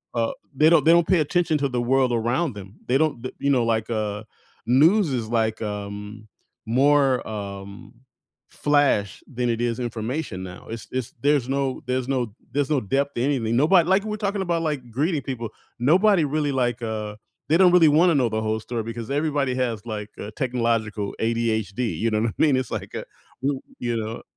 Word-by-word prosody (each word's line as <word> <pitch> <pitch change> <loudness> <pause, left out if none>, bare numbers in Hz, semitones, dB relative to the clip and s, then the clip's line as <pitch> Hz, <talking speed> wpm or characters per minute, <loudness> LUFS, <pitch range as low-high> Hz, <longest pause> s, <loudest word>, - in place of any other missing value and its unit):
uh, 115 -1 +1 0.2
they 155 +3 +5
don't 170 - +4
they 165 - +7
don't 170 -1 +4
pay 185 -3 +4
attention 160 +1 +1
to 140 - +1
the 125 -1 -1
world 130 0 +2
around 120 +4 0
them, 100 +1 -10
they 130 +2 +3
don't 150 -7 0
the 130 - -5
you 140 - 0
know, 125 -3 +3
like, 110 0 0
uh, 105 -1 -2 0.4
news 160 - +4
is, 115 -4 -2
like, 110 -2 0
um, 105 +1 -6 0.4
more, 135 +1 +3
um, 100 +1 -7 0.6
flash 145 -9 +1
than 125 0 -1
it 115 0 -1
is 120 0 -1
information 115 -2 -4
now. 90 -1 -9
It's 115 - -7
it's 130 -2 -3
there's 140 -3 +2
no 135 -1 -1
there's 130 0 -1
no 125 -6 -1 0.2
there's 145 0 0
no 140 - +2
depth 140 +7 -1
to 120 - -1
anything, 120 -5 0
nobody 165 +4 +5
like, 190 +1 +3
we're 215 0 -3
talking 200 -1 -1
about, 170 -2 -1
like, 145 -6 -3
greeting 150 +4 0
people. 120 -5 -4 0.3
Nobody 180 - +4
really, 145 0 0
like, 120 -2 0
uh 105 -2 -4 0.3
they 160 - +5
don't 185 -2 +6
really 175 -3 +6
wanna 165 +2 +4
know 125 -4 +2
the 110 0 -2
whole 110 0 -1
story 115 0 -4
because 115 +2 -6
everybody 145 -3 0
has, 120 -4 -2
like, 105 -2 -5
uh, 105 - -6
technological 115 -5 -1
ADHD, 115 -1 -1
you 115 - +1
know 110 0 +1
what 115 - +1
I - - -7
mean, 150 -4 +4
it's 130 -2 -3
like, - - -5
uh - - -4 0.4
you 135 0 -1 0.2
you 120 -1 -1
know? 110 +1 -5
125 Hz, 195 wpm, -24 LUFS, 110-145 Hz, 0.6 s, they